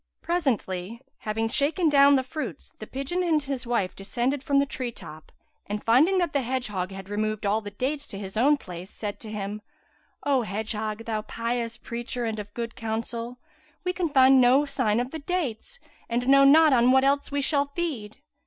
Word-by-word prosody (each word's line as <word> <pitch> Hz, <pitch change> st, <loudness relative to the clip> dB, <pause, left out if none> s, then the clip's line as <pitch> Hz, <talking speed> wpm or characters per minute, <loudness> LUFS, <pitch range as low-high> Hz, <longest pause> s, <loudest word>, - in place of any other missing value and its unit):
presently, 230 Hz, -, -1 dB, 0.2 s
having 220 Hz, +1 st, -1 dB
shaken 300 Hz, +8 st, +1 dB
down 280 Hz, -1 st, +6 dB
the 260 Hz, -, +2 dB
fruits, 305 Hz, +4 st, -6 dB
the -, -, -8 dB
pigeon 275 Hz, +7 st, -2 dB
and 320 Hz, -4 st, +2 dB
his 270 Hz, -3 st, -4 dB
wife 220 Hz, -6 st, 0 dB
descended 245 Hz, +7 st, -1 dB
from 280 Hz, -1 st, +1 dB
the 280 Hz, -, +4 dB
tree 255 Hz, -3 st, -3 dB
top 155 Hz, -8 st, -10 dB, 0.4 s
and 210 Hz, +1 st, -4 dB
finding 295 Hz, +12 st, +4 dB
that 350 Hz, -4 st, 0 dB
the 280 Hz, -, +2 dB
hedgehog 230 Hz, -8 st, -2 dB
had 195 Hz, -1 st, -9 dB
removed 215 Hz, +1 st, -2 dB
all 210 Hz, +2 st, +1 dB
the 205 Hz, -, -7 dB
dates 270 Hz, +8 st, -3 dB
to 195 Hz, -, -6 dB
his 195 Hz, 0 st, -7 dB
own 280 Hz, +7 st, +4 dB
place, 180 Hz, -6 st, -9 dB
said 205 Hz, -1 st, -6 dB
to 220 Hz, -, -8 dB
him, 210 Hz, 0 st, -5 dB, 0.6 s
"O 275 Hz, -3 st, +2 dB
hedgehog! 215 Hz, +1 st, -3 dB
thou 220 Hz, -2 st, -2 dB
pious 230 Hz, +1 st, -3 dB
preacher 240 Hz, +1 st, -4 dB
and 220 Hz, -1 st, -3 dB
of 205 Hz, 0 st, -7 dB
good 230 Hz, -1 st, -4 dB
counsel, 230 Hz, +2 st, -4 dB, 0.5 s
we 360 Hz, 0 st, -1 dB
can 360 Hz, -3 st, -1 dB
find 265 Hz, -2 st, +6 dB
no 260 Hz, +4 st, +5 dB
sign 255 Hz, -6 st, 0 dB
of 250 Hz, +2 st, -2 dB
the 320 Hz, -, -5 dB
dates 335 Hz, -, -3 dB, 0.3 s
and 240 Hz, +1 st, -1 dB
know 275 Hz, +1 st, +7 dB
not 305 Hz, +2 st, +7 dB
on 245 Hz, 0 st, +5 dB
what 265 Hz, +1 st, +5 dB
else 280 Hz, +1 st, +2 dB
we 285 Hz, -, 0 dB
shall 280 Hz, 0 st, +2 dB
feed." 280 Hz, -9 st, -4 dB
245 Hz, 190 wpm, -26 LUFS, 215-280 Hz, 0.6 s, know